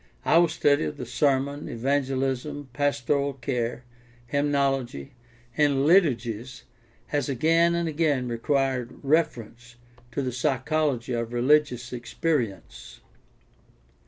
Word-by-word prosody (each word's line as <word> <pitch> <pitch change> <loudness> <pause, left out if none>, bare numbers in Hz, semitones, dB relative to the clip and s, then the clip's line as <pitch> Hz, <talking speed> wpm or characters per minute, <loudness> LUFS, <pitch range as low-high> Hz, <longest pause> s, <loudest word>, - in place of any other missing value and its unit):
Our 170 0 +5
study 145 -2 +2
of 150 - -5
the - - -5
sermon, 140 0 0
evangelism, 135 +2 -2
pastoral 140 0 0
care, 125 -2 -3 0.4
hymnology, 135 - -1 0.4
and 145 -2 +2
liturgies 130 - +1 0.5
has 145 -1 -1
again 165 +6 +3
and 170 -1 -1
again 150 -5 0
required 125 +1 -1
reference 125 -6 -1 0.4
to 140 - -1
the 130 - -2
psy 125 +2 0
chology 135 -3 -1
of 115 0 -3
religious 125 -1 +2
experience. 125 -2 -3
135 Hz, 100 wpm, -26 LUFS, 125-150 Hz, 0.5 s, Our